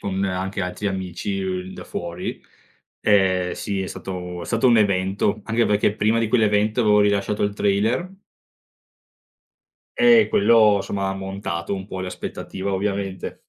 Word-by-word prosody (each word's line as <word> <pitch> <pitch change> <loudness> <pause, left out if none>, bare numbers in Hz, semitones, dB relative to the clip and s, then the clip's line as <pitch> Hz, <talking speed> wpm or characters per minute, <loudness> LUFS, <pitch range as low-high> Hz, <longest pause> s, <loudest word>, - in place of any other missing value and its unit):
con 95 0 -2
anche 95 +1 -3
altri 90 +3 -4
amici, 95 +1 -4
uhm, 95 0 -4
da - - -9
fuori. 85 0 -5 0.6
Eh 95 -3 +3
sì 100 -2 -3
è - - -4
stato 90 -2 -6
è - - -6
stato 115 +2 +1
un 120 - +5
evento, 100 +1 +1
anche 115 +1 +1
perché 105 0 +2
prima 110 +2 +2
di 115 - +1
quell'evento 110 0 +2
avevo 105 -2 +4
rilasciato 100 0 +1
il 100 0 -2
trailer. 110 - 0 1.9
Eh 240 -3 +6
quello, 110 - +5
somma, 95 0 -3
ha 95 - -1
montato 95 -2 -4
un 95 0 -6
po' 95 -2 -6
le 95 - -4
aspettativa, 95 +1 -5
ovviamente. 95 -1 -3
100 Hz, 150 wpm, -22 LUFS, 95-105 Hz, 1.9 s, Eh